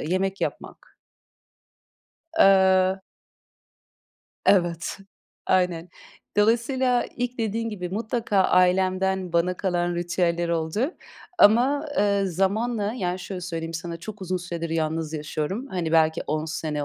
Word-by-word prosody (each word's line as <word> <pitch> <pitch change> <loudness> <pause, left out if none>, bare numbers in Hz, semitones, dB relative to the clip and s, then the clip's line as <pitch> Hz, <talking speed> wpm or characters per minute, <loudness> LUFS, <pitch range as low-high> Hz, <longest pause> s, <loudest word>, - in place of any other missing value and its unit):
yemek 190 +4 -1
yapmak. - - -6 1.4
Eee 190 -3 +5 1.5
Evet. 175 -2 +2 0.5
Aynen. 180 -2 +1 0.5
Dolayısıyla 240 +3 +2
ilk 245 0 -3
dediğin 230 +1 -1
gibi 180 -5 -5
mutlaka 220 +1 -1
ailemden 185 0 +2
bana 175 +2 +1
kalan 175 -2 -1
ritüeller 175 0 0
oldu. 170 - -1 0.4
Ama, 260 +8 +5
ııı, 200 -1 +2
zamanla, 205 +4 0
yani, 180 -5 -2
şöyle 185 0 -6
söyleyeyim 165 -2 -5
sana 170 0 -5
çok 200 +3 -9
uzun 185 0 -2
süredir 170 -2 -5
yalnız 160 -1 -1
yaşıyorum. 155 - -3
Hani, 170 -3 -2
belki 160 0 +3
10 155 +1 -1
sene 155 -2 -3
185 Hz, 110 wpm, -24 LUFS, 170-205 Hz, 1.5 s, Eee